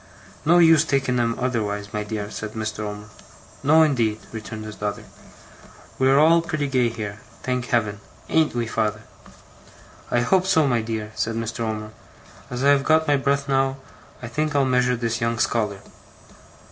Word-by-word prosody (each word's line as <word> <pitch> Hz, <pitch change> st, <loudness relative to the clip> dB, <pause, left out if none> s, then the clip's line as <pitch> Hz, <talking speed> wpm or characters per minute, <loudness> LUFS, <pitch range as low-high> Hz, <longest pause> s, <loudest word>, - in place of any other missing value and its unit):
'No 170 Hz, +3 st, +5 dB
use 165 Hz, -3 st, +6 dB
taking 135 Hz, -4 st, 0 dB
'em 115 Hz, -1 st, +1 dB
otherwise, 105 Hz, -5 st, -2 dB
my 105 Hz, 0 st, -2 dB
dear,' 105 Hz, -1 st, -5 dB
said 110 Hz, 0 st, -6 dB
Mr. 110 Hz, -1 st, -4 dB
Omer. 105 Hz, 0 st, -5 dB, 0.6 s
'No, 155 Hz, +3 st, +5 dB
indeed,' 115 Hz, -8 st, +1 dB
returned 110 Hz, -1 st, -7 dB
his 110 Hz, 0 st, -8 dB
daughter. 105 Hz, -1 st, -4 dB, 1.0 s
'We 130 Hz, 0 st, +4 dB
are 135 Hz, -, +5 dB
all 165 Hz, +3 st, +5 dB
pretty 155 Hz, -3 st, -2 dB
gay 130 Hz, -3 st, +2 dB
here, 105 Hz, -2 st, -6 dB, 0.2 s
thank 125 Hz, -1 st, -2 dB
Heaven! 105 Hz, -4 st, 0 dB, 0.3 s
Ain't 160 Hz, -5 st, +2 dB
we, 120 Hz, -1 st, 0 dB
father?' 110 Hz, -1 st, -2 dB, 1.1 s
'I 120 Hz, -, +2 dB
hope 185 Hz, +9 st, +2 dB
so, 160 Hz, -5 st, +4 dB
my 120 Hz, -3 st, +1 dB
dear,' 110 Hz, -1 st, -4 dB
said 115 Hz, +1 st, -2 dB
Mr. 115 Hz, 0 st, -4 dB
Omer. 110 Hz, -2 st, -3 dB, 0.6 s
'As 125 Hz, +1 st, -4 dB
I 140 Hz, -, +5 dB
have 140 Hz, -1 st, +3 dB
got 160 Hz, +1 st, +3 dB
my 145 Hz, -, +4 dB
breath 140 Hz, 0 st, 0 dB
now, 135 Hz, 0 st, +1 dB, 0.5 s
I -, -, -4 dB
think 150 Hz, +5 st, -2 dB
I'll 140 Hz, -1 st, +3 dB
measure 125 Hz, -1 st, +2 dB
this 115 Hz, -1 st, -2 dB
young 115 Hz, 0 st, 0 dB
scholar. 105 Hz, -4 st, 0 dB
120 Hz, 170 wpm, -23 LUFS, 110-140 Hz, 1.1 s, use